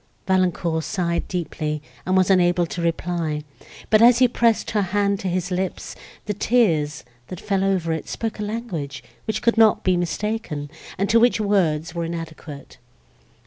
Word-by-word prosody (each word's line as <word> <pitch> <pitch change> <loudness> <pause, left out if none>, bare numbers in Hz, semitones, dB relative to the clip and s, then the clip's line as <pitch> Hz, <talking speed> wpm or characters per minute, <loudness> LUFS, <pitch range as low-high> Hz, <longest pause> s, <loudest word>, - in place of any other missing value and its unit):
Valancourt 180 -3 +1
sighed 170 -3 -2
deeply, 155 -4 -3 0.3
and 185 0 +2
was 185 +1 +4
unable 175 -2 +3
to 170 +1 -5
reply; 165 -2 -2 0.5
but, 215 0 +6
as 240 +1 +7
he 255 0 +5
pressed 235 -2 +1
her 210 - +1
hand 200 +1 0
to 195 - -4
his 180 0 -2
lips, 185 0 -3 0.3
the 210 - -2
tears, 165 - +1 0.2
that 185 - -7
fell 195 -2 -1
over 185 -4 +1
it, 160 - -5
spoke 225 -1 -4
a - - -2
language, 195 - -5 0.2
which 220 -1 -2
could 235 -1 +3
not 220 -2 +5
be 185 - +3
mistaken, 175 -3 -3 0.3
and 200 +2 0
to 230 +2 +4
which 240 -1 +3
words 175 -6 +1
were 170 -1 -2
inadequate. 160 -5 -8
185 Hz, 165 wpm, -22 LUFS, 165-210 Hz, 0.5 s, as